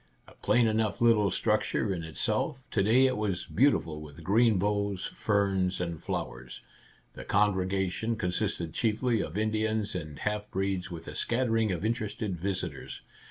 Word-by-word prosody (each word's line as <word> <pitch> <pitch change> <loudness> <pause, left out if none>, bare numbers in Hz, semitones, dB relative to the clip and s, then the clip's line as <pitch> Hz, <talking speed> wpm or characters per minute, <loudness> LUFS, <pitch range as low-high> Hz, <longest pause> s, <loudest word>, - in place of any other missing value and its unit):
A - - -15
plain 120 -1 +2
enough 110 0 +1
little 115 -4 +4
structure 105 0 0
in 85 -3 -4
itself, 110 - -1
to 100 - +2
day 115 +6 +5
it 130 -3 +1
was 100 -4 -1
beautiful 85 - +2
with 75 +2 -11
green 110 +4 +4
boughs, 100 -1 0
ferns, 95 -3 0
and 85 -3 -3
flowers. 65 -2 -5 0.5
The - - -8
congregation 95 +2 +1
consisted 90 -4 -2
chiefly 115 0 +1
of 80 +2 -5
Indians 110 0 0
and 75 -5 -5
half 105 0 -2
breeds, 95 -1 -2
with 85 -2 -8
a - - -6
scattering 115 -3 +1
of 90 +3 -2
interested 110 -3 -2
visitors. 95 +2 -4
100 Hz, 150 wpm, -29 LUFS, 90-110 Hz, 0.5 s, day